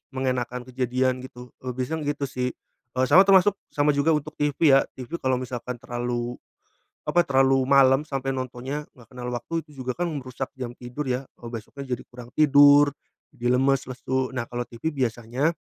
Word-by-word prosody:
mengenakan 125 -1 -1
kejadian 130 0 0
gitu. 125 -1 -11
Eee, 125 -1 -5
biasanya 145 +4 -3
yang 145 - 0
gitu 145 - -5
sih. 125 -1 -2 0.4
Eee, 130 - +2
sama 185 +7 +7
termasuk 195 +1 +5
sama 145 0 +2
juga 145 +3 +2
untuk 150 0 -3
TV 145 -1 +1 0.2
ya, 135 0 +5
TV 130 +7 -6
kalau 130 -1 +1
misalkan 125 0 -4
terlalu, 120 0 -4 0.7
apa 175 - +4
terlalu 135 -3 +3
malam 135 0 +6
sampai 135 -3 -3
nontonnya 130 +3 -4
nggak 120 -1 -19
kenal 125 0 -5
waktu, 160 +7 -3
itu 145 -4 -11
juga 125 - -1
kan 175 0 -2
merusak 130 -2 -5
jam 120 -2 -5
tidur 125 +4 -6
ya, 125 0 -1 0.2
eee, 120 - -10
besoknya 125 +3 -5
jadi 125 - -9
kurang 120 -1 -11
tidur, 145 -1 +7 0.4
jadi 120 -1 +1
lemes, 135 +1 +2
lesu. 130 +1 -2
Nah 120 -2 -3
kalau 120 0 -3
TV 120 +7 -4
biasanya 130 +2 -1
130 Hz, 180 wpm, -25 LUFS, 125-145 Hz, 0.7 s, sama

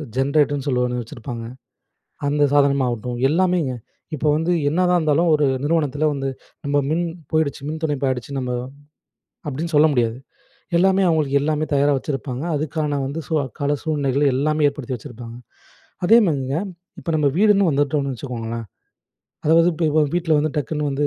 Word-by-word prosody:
Generator 140 +2 +2
ன்னு 140 - -6
சொல்லி 125 -3 +1
ஒண்ணு 125 0 -2
வச்சிருப்பாங்க. 115 +1 -7 0.8
அந்த 145 +1 +1
சாதனமா 140 -2 +3
ஆகட்டும், 120 +1 -4
எல்லாமேங்க! 170 -4 +1 0.4
இப்ப 150 0 -2
வந்து 165 +3 0 0.2
என்னதான் 180 +3 +2
இருந்தாலும், 160 +2 +2
ஒரு 150 - +2 0.2
நிறுவனத்துல 150 -1 +1
வந்து 135 -1 -3 0.4
நம்ப 145 0 +1
மின் 170 +2 +1 0.3
போயிடுச்சு, 155 -3 0
மின் 155 +1 -4
துண்டிப்பு 145 -3 -1
ஆயிடுச்சு, 130 +1 -3
நம்ப 125 -1 -2 1.0
அப்படின்னு 155 +5 -3
சொல்ல 150 +2 +6
முடியாது. 115 -2 +1 0.6
எல்லாமே 190 +2 +3
அவங்களுக்கு 150 -4 +2
எல்லாமே 155 +1 0
தயாரா 145 +1 +3
வச்சிருப்பாங்க. 135 -1 -4
அதுக்கான 150 -1 -1
வந்து 140 +4 -4
சூ - - -4
அக்கால 140 +4 -2
சூழ்நிலைகள் 145 -3 0
எல்லாமே 155 +2 +1
ஏற்படுத்தி 135 -3 -5
வச்சிருப்பாங்க. 120 -1 -9 0.7
அதேமாதிரிங்க, 160 - +3 0.4
இப்ப 170 - -6
நம்ப 150 -2 +2
வீடுன்னு 205 -2 +4
வந்துட்டோம்னு 145 -1 0
வச்சுக்கோங்களேன். 115 -3 -5 0.8
அதாவது 165 +2 +5
இப்ப 160 +1 -2
இப்ப 155 +1 +3
வீட்டுல 170 -3 +1
வந்து 155 +1 0
டக்குன்னு 150 +1 -2
வந்து 140 +2 0
145 Hz, 150 wpm, -21 LUFS, 135-155 Hz, 1.0 s, சொல்ல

